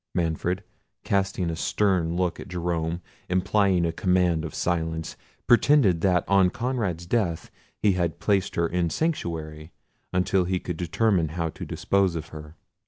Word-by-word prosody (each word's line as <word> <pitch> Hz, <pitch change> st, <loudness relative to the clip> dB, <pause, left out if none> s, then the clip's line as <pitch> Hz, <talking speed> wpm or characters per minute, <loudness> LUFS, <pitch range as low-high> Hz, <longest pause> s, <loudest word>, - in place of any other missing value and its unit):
Manfred, 85 Hz, +3 st, -1 dB, 0.4 s
casting 95 Hz, -3 st, 0 dB
a -, -, -3 dB
stern 90 Hz, -1 st, +1 dB
look 90 Hz, -1 st, -1 dB
at -, -, -8 dB
Jerome, 85 Hz, -1 st, -2 dB, 0.3 s
implying 95 Hz, 0 st, +2 dB
a 85 Hz, -, 0 dB
command 90 Hz, -2 st, +1 dB
of 80 Hz, -, -6 dB
silence, 80 Hz, -2 st, -2 dB, 0.3 s
pretended 120 Hz, -, +4 dB
that 90 Hz, -2 st, +2 dB
on 95 Hz, -2 st, +4 dB
Conrad's 110 Hz, -8 st, -2 dB
death 90 Hz, -5 st, -1 dB, 0.3 s
he 105 Hz, -, +5 dB
had 85 Hz, -3 st, -1 dB
placed 100 Hz, -2 st, +1 dB
her 85 Hz, -, +2 dB
in 85 Hz, 0 st, 0 dB
sanctuary 80 Hz, -, -3 dB, 0.4 s
until 90 Hz, 0 st, +1 dB
he 90 Hz, 0 st, 0 dB
could 90 Hz, -2 st, -5 dB
determine 90 Hz, +1 st, +1 dB
how 85 Hz, +1 st, -2 dB
to -, -, -8 dB
dispose 95 Hz, -3 st, +1 dB
of 80 Hz, 0 st, -5 dB
her. 75 Hz, 0 st, -10 dB
90 Hz, 150 wpm, -25 LUFS, 80-95 Hz, 0.4 s, he